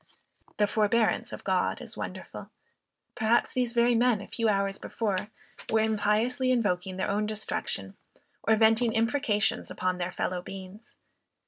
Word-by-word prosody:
The 210 - +4
forbearance 215 +2 +1
of - - -8
God - - 0
is - - -8
wonderful. - - -7 0.6
Perhaps 225 +1 +2
these 250 -2 0
very 240 0 +4
men 240 -2 +3
a 200 - -8
few 230 -2 0
hours 195 -1 0
before, 205 -4 -2 0.4
were 220 0 +3
impiously 220 +4 +1
invoking 190 -6 0
their - - -1
own 210 +1 0
destruction, 215 0 -2 0.5
or 220 - +3
venting 225 +1 +4
imprecations 230 -1 +1
upon 185 0 -2
their 175 +1 -2
fellow 180 0 -2
beings! 195 +4 -10
220 Hz, 140 wpm, -28 LUFS, 200-235 Hz, 0.6 s, The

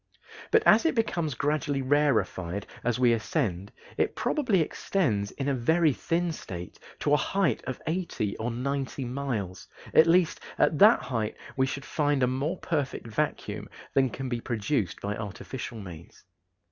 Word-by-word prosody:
But 445 -1 +4
as 215 - +7
it 325 - +1
becomes 170 - 0
gradually 145 -1 0
rarefied 120 - +1 0.2
as 120 0 +1
we 125 -2 +4
ascend, 110 - -1 0.3
it - - +1
probably 250 - +1
extends 115 - 0
in 135 +5 -4
a 140 - +2
very 155 +5 +3
thin 170 +5 -1
state 90 - -8 0.2
to 145 - +2
a - - +6
height 195 +3 0
of 130 - -4
eighty 160 - -2
or 115 +2 -2
ninety 135 +2 -2
miles; 120 -8 -3 0.3
at 160 - +7
least, 170 -1 +3 0.2
at 150 0 +3
that 215 +3 +7
height 110 -4 -2 0.2
we 130 0 +2
should 135 +1 -5
find 145 -3 +1
a - - +6
more 140 +8 -1
perfect 145 -9 -2
vacuum 130 +7 -3 0.2
than 135 -1 +3
can 135 +2 -5
be 120 -2 -2
produced 115 -2 -1
by 100 +1 -2
artificial 110 +3 -6
means. 85 -5 -11
135 Hz, 160 wpm, -28 LUFS, 115-155 Hz, 0.3 s, as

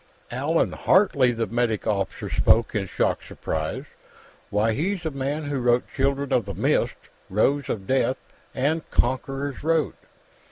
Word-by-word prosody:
"Allan 145 +7 +1
Hartley!" 140 -10 +3
The 115 -1 -1
medic 115 -1 -1
officer 100 -3 -1
spoke 115 0 +3
in 100 -3 -1
shocked - - -1
surprise. 80 -1 -3 0.6
"Why, 110 +2 +2
he's 175 - -1
the 160 - -2
man 140 +3 -2
who 145 -2 -2
wrote 120 0 +3
'Children 140 0 0
of 120 - +2
the 100 - -5
Mist', - - +1 0.3
'Rose 135 +8 +1
of 100 -3 -3
Death', 130 +2 +1 0.4
and 145 +5 +1
'Conqueror's 135 +3 -1
Road'!" 160 -1 +1
130 Hz, 145 wpm, -25 LUFS, 115-145 Hz, 0.6 s, Hartley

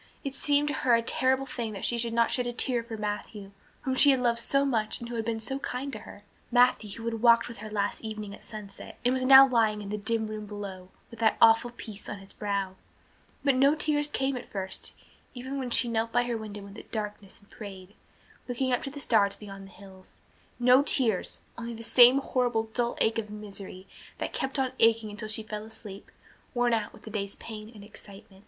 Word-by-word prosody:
It 275 - -4
seemed 290 +1 +2
to - - -1
her 245 -4 +3
a 230 - +1
terrible 260 +3 +1
thing 235 -4 -4
that 195 - -4
she 235 - 0
could 235 0 -1
not 230 0 +2
shed 250 -1 0
a 240 - -3
tear 245 0 +1
for 230 -1 -7
Matthew, 205 -1 -5 0.3
whom 260 - -1
she 285 +2 +5
had 265 -2 +4
loved 235 -1 +1
so 275 +4 +2
much 225 -5 0
and 235 - -7
who 240 - -5
had 225 - -1
been 225 -1 -2
so 265 +5 -3
kind 270 +1 -4
to 215 - -4
her, 205 - -13 0.3
Matthew 245 -3 +4
who 230 - -8
had 225 -1 -3
walked 235 -1 +5
with 235 -4 -9
her 215 +1 -7
last 205 -1 -2
evening 215 -2 -6
at - - -12
sunset 210 -2 -9
and 250 - +4
was 255 0 0
now 270 0 +10
lying 225 -4 +2
in 200 -1 -7
the 210 +1 -3
dim 220 +1 -1
room 215 -1 -6
below 195 -3 -7 0.2
with 230 - -12
that 220 -1 +3
awful 225 +1 +6
peace 220 -4 -9
on 205 - -5
his 195 0 -12
brow. 200 -2 -3 0.7
But 275 - +4
no 275 +3 +4
tears 295 -1 +2
came 270 -2 -1
at 250 - -7
first, 190 -2 -5 0.4
even 260 +3 -5
when 255 -2 -3
she 240 0 +3
knelt 225 0 -1
by 245 +1 +3
her 240 -1 -2
window 210 -2 -7
in 200 - -11
the 215 - -9
darkness 210 -2 -6
and 205 - -25
prayed, 195 -3 -10 0.5
looking 255 +1 -1
up 245 - +1
to - - -5
the 285 +1 -8
stars 210 -7 +2
beyond 195 -2 -10
the - - -16
hills 190 -1 -15 0.4
no 250 +2 +6
tears, 235 -8 +2 0.2
only 235 0 -5
the 230 - -9
same 245 +3 +7
horrible 245 -4 0
dull 240 -1 -1
ache 225 +1 +2
of 210 -2 -5
misery 200 -3 -7 0.3
that - - -4
kept 265 +2 -2
on 265 -2 0
aching 225 -1 +3
until 215 +1 -6
she 215 0 0
fell 210 0 -6
asleep, 215 -2 -9 0.5
worn 240 -1 +2
out 225 -2 -1
with - - -17
the 220 - -9
day's 200 -2 -3
pain 215 -1 -9
and 205 - -11
excitement. 200 -1 -13
225 Hz, 230 wpm, -28 LUFS, 210-250 Hz, 0.7 s, now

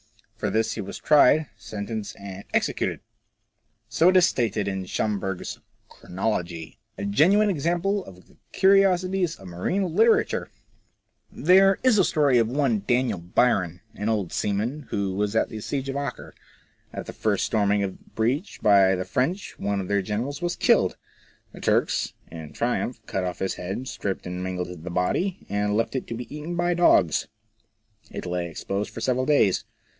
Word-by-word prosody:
For - - -2
this 110 0 0
he - - -4
was 100 - -7
tried, 150 0 +5
sentenced, 105 0 -6
and 100 0 -8
executed! - - 0 0.9
So 160 +9 +4
it 185 - +5
is 180 - +7
stated 110 -8 0
in 95 -1 -3
Schomberg's 95 -2 -3
" - - -41
Chronology." 90 -4 -4 0.2
A 100 - -4
genuine 190 - +4
example 175 +5 0
of 90 -1 -14
the - - -24
curiosities 190 -2 +3
of 95 - -13
marine 165 - -2
literature! 225 +3 +3 0.8
There 190 +5 +5
is 250 -5 +4
a - - +6
story 145 -7 +3
of 115 - +2
one 125 -4 +1
Daniel 120 -5 +1
Bryan, 90 -1 +1
an 105 +2 -3
old 105 -6 -1
seaman, 115 +8 -2
who 100 -2 -1
was 105 +2 -1
at - - +2
the 110 - -7
Siege 135 +4 -3
of 135 - -3
Acre. 140 0 -5 0.6
At - - -6
the - - -8
first - - 0
storming 100 -1 +1
of 95 - -2
the - - -24
breach 130 - -1
by 100 -2 +5
the 90 0 -3
French, 140 - -2
one 100 0 -1
of 95 - -4
their 100 0 +1
generals 115 - -3
was 175 0 -1
killed. - - +3 0.5
The - - -12
Turks - - +1 0.2
in 80 -2 -9
triumph 120 0 -1
cut 95 - -2
off 90 -1 -3
his 95 - -2
head, 95 +9 -5
stripped 95 -5 -4
and 90 0 -5
mangled 90 -2 -4
the 90 - -5
body, 170 - -1
and 105 0 0
left 115 - -1
it 130 - -3
to 115 - -4
be 125 +5 -7
eaten 155 +4 -5
by 175 +1 +1
dogs. 100 - +3 0.8
It - - -7
lay 90 -1 -2
exposed 100 +5 -3
for 115 - -8
several 130 +2 0
days. 140 -11 +3
110 Hz, 170 wpm, -25 LUFS, 95-155 Hz, 0.9 s, is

